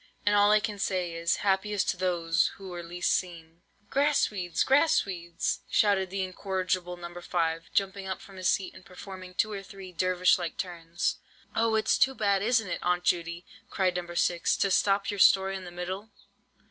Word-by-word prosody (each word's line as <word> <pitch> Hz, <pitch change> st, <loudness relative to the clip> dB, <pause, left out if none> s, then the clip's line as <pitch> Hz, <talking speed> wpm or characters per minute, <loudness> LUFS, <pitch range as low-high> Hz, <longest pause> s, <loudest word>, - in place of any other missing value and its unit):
And 205 Hz, -, +3 dB
all 205 Hz, 0 st, +5 dB
I 215 Hz, -, +6 dB
can 205 Hz, -1 st, -4 dB
say 180 Hz, -3 st, -1 dB
is, 165 Hz, 0 st, 0 dB
happiest 200 Hz, +1 st, +1 dB
those 170 Hz, -3 st, +1 dB
who 195 Hz, -1 st, -9 dB
were 175 Hz, -1 st, -6 dB
least 175 Hz, +1 st, -1 dB
seen!" 170 Hz, -2 st, -4 dB, 0.3 s
"Grass 285 Hz, -2 st, +2 dB
weeds! 180 Hz, -4 st, -1 dB
grass 285 Hz, +4 st, +4 dB
weeds!" 175 Hz, -3 st, -3 dB
shouted 200 Hz, -3 st, +2 dB
the 195 Hz, +1 st, -2 dB
incorrigible 185 Hz, -1 st, -2 dB
No. 175 Hz, 0 st, -8 dB
5, 165 Hz, -2 st, -1 dB
jumping 195 Hz, 0 st, -1 dB
up 190 Hz, -, -3 dB
from 195 Hz, -1 st, -14 dB
his 185 Hz, -1 st, +1 dB
seat 190 Hz, -2 st, 0 dB
and -, -, -14 dB
performing 185 Hz, -1 st, -10 dB
two 215 Hz, -, +1 dB
or 200 Hz, -1 st, -4 dB
three 195 Hz, -1 st, -11 dB
Dervish 185 Hz, +1 st, +2 dB
like 170 Hz, -2 st, -4 dB
turns. 170 Hz, -2 st, -3 dB, 0.4 s
"Oh, 225 Hz, 0 st, +2 dB
it's 220 Hz, -, +2 dB
too 265 Hz, 0 st, +3 dB
bad, 200 Hz, -3 st, +1 dB
isn't 225 Hz, 0 st, +2 dB
it, 170 Hz, -, -3 dB
Aunt 180 Hz, 0 st, 0 dB
Judy," 170 Hz, 0 st, -1 dB, 0.2 s
cried 185 Hz, -2 st, 0 dB
No. 175 Hz, -1 st, -4 dB
6, 170 Hz, 0 st, +1 dB
"to 195 Hz, -, +1 dB
stop 200 Hz, +1 st, +2 dB
your 205 Hz, -, -5 dB
story 195 Hz, 0 st, +5 dB
in 190 Hz, -1 st, -6 dB
the -, -, -7 dB
middle?" 185 Hz, +4 st, -5 dB
185 Hz, 185 wpm, -28 LUFS, 175-200 Hz, 0.4 s, I